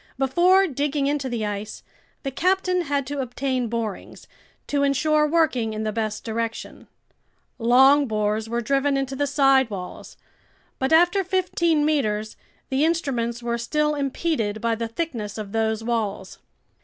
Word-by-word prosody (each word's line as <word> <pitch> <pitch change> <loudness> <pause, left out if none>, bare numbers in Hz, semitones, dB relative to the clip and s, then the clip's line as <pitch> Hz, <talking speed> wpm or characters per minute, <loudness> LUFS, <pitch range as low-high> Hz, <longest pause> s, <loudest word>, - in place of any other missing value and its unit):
Before 350 +9 +4
digging 290 -2 -1
into 280 -2 -1
the 230 -3 -2
ice, 205 0 -5 0.4
the 275 - -3
captain 365 +4 +1
had 280 -1 -1
to 280 +1 -3
obtain 255 0 -2
borings, 225 -3 -5 0.4
to 285 -1 -1
insure 300 +2 +2
working 290 -9 +1
in 215 0 -3
the 215 - -1
best 215 -1 -3
direction. 230 0 -5 0.7
Long 265 +5 +5
bores 215 0 -1
were 235 +1 -1
driven 275 +3 +1
into 270 0 -2
the 285 +1 0
side 270 -3 +3
walls; 185 -3 -8 0.6
but 265 +2 0
after 350 +4 +4
fifteen 340 -4 +1
meters, 215 -8 0 0.3
the 265 +2 +1
instruments 245 -8 -1
were 235 0 -2
still 300 +5 0
impeded 275 -6 -1
by 230 +1 0
the 230 +1 -3
thickness 230 -6 -4
of 210 -2 -6
those 220 0 0
walls. 215 -5 -3
265 Hz, 145 wpm, -23 LUFS, 225-295 Hz, 0.7 s, Long